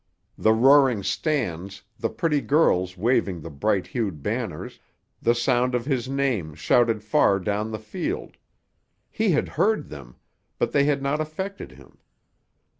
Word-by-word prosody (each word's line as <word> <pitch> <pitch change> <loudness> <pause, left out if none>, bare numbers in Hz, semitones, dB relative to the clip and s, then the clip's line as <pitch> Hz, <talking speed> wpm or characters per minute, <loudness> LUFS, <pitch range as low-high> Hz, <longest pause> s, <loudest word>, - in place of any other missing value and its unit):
The 110 - +3
roaring 130 -1 +5
stands, 100 - -2 0.2
the - - -1
pretty 150 -3 0
girls 95 - +2
waving 100 -4 +1
the 85 - -8
bright 95 +6 0
hued 100 - -4
banners, 110 -7 -4 0.4
the 120 +1 +3
sound 125 +1 +1
of 120 -1 -2
his 130 -3 -1
name 125 - -1
shouted 110 +8 +2
far 100 -2 +3
down 105 +3 -2
the 110 - -4
field—he 220 - -6
had 155 - +2
heard 215 +1 0
them, 65 -5 -11 0.4
but - - 0
they 140 - +3
had 145 -1 0
not 145 +3 0
affected 190 +6 -6
him. - - -18
120 Hz, 140 wpm, -24 LUFS, 100-140 Hz, 0.4 s, roaring